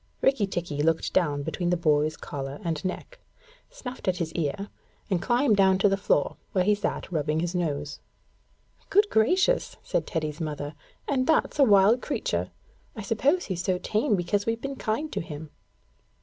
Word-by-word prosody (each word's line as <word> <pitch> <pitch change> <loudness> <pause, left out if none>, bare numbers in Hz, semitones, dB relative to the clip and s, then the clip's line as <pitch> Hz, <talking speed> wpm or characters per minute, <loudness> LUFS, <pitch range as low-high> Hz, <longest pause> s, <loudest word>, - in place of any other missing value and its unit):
Rikki 265 -7 +3
tikki 170 -6 -3
looked 160 +1 +1
down 145 -5 +1
between 175 +3 -2
the 180 - +2
boy's 155 -2 +2
collar 135 0 -6
and 165 -4 -2
neck, 345 - -5 0.5
snuffed 260 - -8
at 185 -1 +2
his 160 -2 -3
ear, 175 +5 -2 0.4
and 180 -3 +1
climbed 240 0 +3
down 190 -1 +5
to 195 - +4
the 195 - +3
floor, 195 -7 +1 0.2
where 185 - +3
he 210 +3 +4
sat 205 -2 -3
rubbing 155 -1 0
his 175 +1 -2
nose. 145 -5 -2 0.9
'Good 410 +1 +4
gracious,' 370 - +2
said - - -1
Teddy's 155 -1 -3
mother, 150 -1 -4 0.3
'and 260 -3 +1
that's 315 -1 +2
a - - +8
wild 210 +1 +5
creature! - - -2 0.5
I 215 - -6
suppose 270 - +1
he's 175 -3 -3
so 185 -1 +1
tame 215 +3 +1
because 200 +3 -1
we've 230 0 0
been 275 +2 -4
kind 265 +7 -2
to - - -1
him.' 155 -2 -8
185 Hz, 175 wpm, -27 LUFS, 160-225 Hz, 0.9 s, a